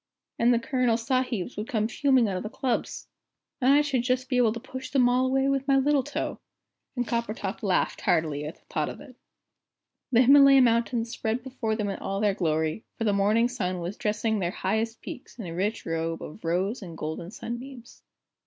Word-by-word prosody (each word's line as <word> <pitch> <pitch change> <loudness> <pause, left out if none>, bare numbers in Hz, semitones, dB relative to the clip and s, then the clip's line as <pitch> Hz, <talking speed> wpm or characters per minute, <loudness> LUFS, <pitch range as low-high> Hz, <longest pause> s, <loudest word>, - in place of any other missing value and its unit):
And 235 +1 +4
the 240 - +4
Colonel 240 -1 +1
Sahibs 250 -3 -1
would 210 +2 -4
come 215 -2 0
fuming 260 -1 +3
out 195 - -2
of - - -4
the 215 - -5
clubs! 245 +1 -2 0.5
And 255 +2 +5
I 290 +1 +6
should 280 -4 0
just 255 +1 -1
be 250 - +1
able 240 -3 +4
to 230 - -5
push 260 +1 -8
them 260 -3 +3
all 250 +1 +2
away 270 +1 +2
with 275 0 0
my 275 -1 +4
little 280 +1 +3
toe." - - -4 0.6
And 245 -2 -1
Coppertop 220 -3 -3
laughed 195 -5 0
heartily 155 -4 +1
at 155 - -6
the - - -30
thought - - -2
of - - -8
it. - - -13 1.0
The 245 0 +6
Himalaya 275 +1 +8
Mountains 235 0 +1
spread 225 +2 -2
before 255 -4 -2
them 210 -2 -2
in 195 - -4
all 195 0 -3
their 205 -1 +2
glory, 160 +1 -1
for - - -2
the 210 -2 +2
morning 210 +4 +3
sun 185 -7 -3
was 175 +4 -4
dressing 215 0 -1
their 175 -3 0
highest 220 +5 -2
peaks 250 - -9
in 225 - -6
a 165 - -6
rich 200 +6 -2
robe 165 0 -2
of 155 - -10
rose 185 +8 -1
and 170 -4 -9
golden 160 +2 -5
sunbeams. 240 +3 -8
230 Hz, 205 wpm, -27 LUFS, 195-255 Hz, 1.0 s, Himalaya